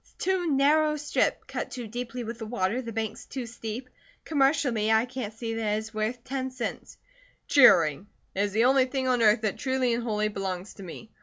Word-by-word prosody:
It's -, -, -27 dB
too 370 Hz, -2 st, +1 dB
narrow 300 Hz, +2 st, +4 dB
a -, -, -3 dB
strip, 300 Hz, 0 st, 0 dB
cut -, -, -4 dB
too 245 Hz, -3 st, -6 dB
deeply 240 Hz, +2 st, -5 dB
with 230 Hz, +1 st, -6 dB
the 225 Hz, -, -5 dB
water, 220 Hz, +1 st, -1 dB
the 230 Hz, -2 st, -6 dB
banks 220 Hz, -1 st, -4 dB
too 260 Hz, -3 st, -5 dB
steep. 230 Hz, +2 st, -6 dB, 0.4 s
Commercially, 270 Hz, -7 st, +2 dB
I 220 Hz, +1 st, +4 dB
can't 250 Hz, -4 st, -5 dB
see 225 Hz, +1 st, -5 dB
that 220 Hz, -2 st, 0 dB
it -, -, 0 dB
is 220 Hz, +1 st, -6 dB
worth 220 Hz, +3 st, -2 dB
ten 260 Hz, 0 st, -3 dB
cents." 255 Hz, -3 st, -6 dB, 0.5 s
"Cheering! 175 Hz, -, +5 dB, 0.3 s
It 195 Hz, -, -1 dB
is 205 Hz, 0 st, 0 dB
the 225 Hz, +4 st, +3 dB
only 265 Hz, 0 st, +5 dB
thing 260 Hz, 0 st, -2 dB
on 250 Hz, -2 st, +2 dB
earth 215 Hz, 0 st, +5 dB
that 215 Hz, -3 st, -2 dB
truly 260 Hz, -3 st, +1 dB
and 235 Hz, -, -1 dB
wholly 215 Hz, -2 st, 0 dB
belongs 195 Hz, -1 st, -4 dB
to -, -, -13 dB
me. 190 Hz, +5 st, -10 dB
235 Hz, 215 wpm, -27 LUFS, 215-260 Hz, 0.5 s, Cheering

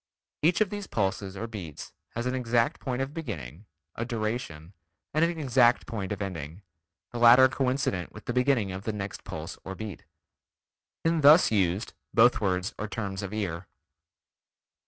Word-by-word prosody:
Each 170 Hz, +6 st, +3 dB
of 210 Hz, -, +2 dB
these 205 Hz, -1 st, -5 dB
pulses 95 Hz, -1 st, -2 dB
or 110 Hz, -, -3 dB
beats 95 Hz, -10 st, -8 dB, 0.2 s
has 120 Hz, +1 st, -2 dB
an 125 Hz, -, 0 dB
exact 120 Hz, +2 st, +1 dB
point 130 Hz, -1 st, -2 dB
of 135 Hz, +2 st, -6 dB
beginning, 85 Hz, -, -7 dB, 0.3 s
a 115 Hz, -, -3 dB
duration, 110 Hz, -8 st, -4 dB, 0.4 s
and 155 Hz, +2 st, +3 dB
an 170 Hz, 0 st, +1 dB
exact 125 Hz, -4 st, +4 dB
point 100 Hz, -4 st, -4 dB
of 105 Hz, 0 st, -2 dB
ending, 85 Hz, -1 st, -6 dB, 0.5 s
the 120 Hz, -, -5 dB
latter 120 Hz, +2 st, +8 dB
coincident 130 Hz, -7 st, -1 dB
with 105 Hz, -, -12 dB
the 120 Hz, -, -2 dB
beginning 125 Hz, -5 st, +2 dB
of 95 Hz, +1 st, -5 dB
the 110 Hz, -, -2 dB
next 100 Hz, -1 st, -5 dB
pulse -, -, -7 dB
or 95 Hz, -, -6 dB
beat. 105 Hz, -2 st, -7 dB, 1.0 s
When 165 Hz, -1 st, +2 dB
thus 150 Hz, +2 st, +7 dB
used, 95 Hz, 0 st, +1 dB, 0.2 s
both 120 Hz, +1 st, +5 dB
words 90 Hz, -2 st, 0 dB
are 110 Hz, -, -2 dB
terms 100 Hz, -3 st, -4 dB
of 100 Hz, -1 st, -5 dB
ear. 95 Hz, -5 st, -3 dB
110 Hz, 165 wpm, -28 LUFS, 95-130 Hz, 1.0 s, latter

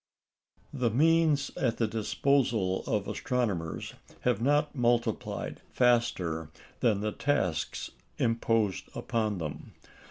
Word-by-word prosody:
The 125 Hz, -2 st, +1 dB
means 155 Hz, +2 st, +3 dB
at 120 Hz, -3 st, 0 dB
the 115 Hz, -, +2 dB
disposal 110 Hz, -2 st, +1 dB
of 105 Hz, -3 st, 0 dB
astronomers 105 Hz, -11 st, -2 dB, 0.3 s
have 125 Hz, -3 st, +1 dB
not 145 Hz, +3 st, +2 dB
multiplied 120 Hz, -2 st, 0 dB
faster 95 Hz, -11 st, +1 dB, 0.3 s
than 105 Hz, -4 st, +2 dB
the 105 Hz, 0 st, -1 dB
tasks 90 Hz, -, -1 dB, 0.3 s
imposed 115 Hz, -3 st, +1 dB
upon 110 Hz, -3 st, -1 dB
them. 75 Hz, -4 st, -6 dB
115 Hz, 100 wpm, -29 LUFS, 100-125 Hz, 0.3 s, means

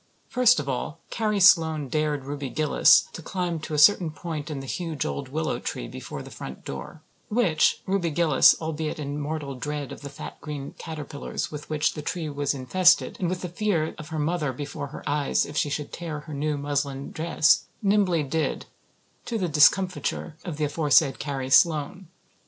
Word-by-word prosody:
First 250 Hz, -1 st, +4 dB
of 140 Hz, -, -4 dB
all 135 Hz, +4 st, -3 dB
Carrie 215 Hz, -2 st, 0 dB
Sloane 160 Hz, -5 st, +5 dB
dared 150 Hz, 0 st, -1 dB
Ruby 140 Hz, -1 st, -4 dB
Gillis 155 Hz, +2 st, +5 dB
to -, -, -7 dB
climb 175 Hz, -1 st, -3 dB
to 155 Hz, 0 st, -5 dB
a -, -, -1 dB
certain 170 Hz, +2 st, +6 dB
point 155 Hz, -1 st, -6 dB
in 150 Hz, -3 st, -4 dB
the 135 Hz, -, -7 dB
huge 160 Hz, +2 st, -3 dB
old 140 Hz, -2 st, -4 dB
willow 155 Hz, +3 st, -2 dB
tree -, -, -5 dB
before -, -, -7 dB
the -, -, -11 dB
front 65 Hz, -, -9 dB
door; 70 Hz, -, -7 dB, 0.3 s
which 205 Hz, -9 st, +2 dB
Ruby 190 Hz, -3 st, 0 dB
Gillis, 160 Hz, -3 st, +5 dB
albeit 160 Hz, -1 st, -3 dB
in 145 Hz, -1 st, -4 dB
mortal 145 Hz, -1 st, -4 dB
dread 145 Hz, +2 st, -4 dB
of -, -, -9 dB
the 140 Hz, -, -7 dB
fat 145 Hz, +3 st, -9 dB
green 145 Hz, -3 st, -6 dB
caterpillars 150 Hz, -3 st, -5 dB
with 150 Hz, -1 st, -8 dB
which 155 Hz, -1 st, +1 dB
said 150 Hz, -, -7 dB
tree 165 Hz, -4 st, -2 dB
was 145 Hz, 0 st, -1 dB
infested 175 Hz, +8 st, +3 dB
and 180 Hz, -, 0 dB
with 180 Hz, 0 st, -3 dB
the 180 Hz, -, -3 dB
fear 175 Hz, -4 st, 0 dB
of 155 Hz, -, -8 dB
her 160 Hz, -, -4 dB
mother 155 Hz, -1 st, 0 dB
before 145 Hz, +2 st, -6 dB
her 145 Hz, -, -9 dB
eyes 145 Hz, -1 st, +1 dB
if 145 Hz, -, -9 dB
she 145 Hz, -, +1 dB
should 145 Hz, +1 st, -4 dB
tear 160 Hz, -4 st, -5 dB
her 155 Hz, 0 st, -9 dB
new 145 Hz, +1 st, -1 dB
muslin 140 Hz, -1 st, -2 dB
dress, 165 Hz, 0 st, +2 dB, 0.2 s
nimbly 195 Hz, -5 st, +3 dB
did, 155 Hz, +3 st, -2 dB, 0.6 s
to 235 Hz, -, -2 dB
the 185 Hz, -4 st, -1 dB
discomfiture 170 Hz, +1 st, +2 dB
of 170 Hz, -6 st, -5 dB
the 155 Hz, -, +1 dB
aforesaid 145 Hz, -1 st, +3 dB
Carrie 135 Hz, -2 st, -4 dB
Sloane. 165 Hz, +5 st, +3 dB
155 Hz, 185 wpm, -25 LUFS, 145-170 Hz, 0.6 s, certain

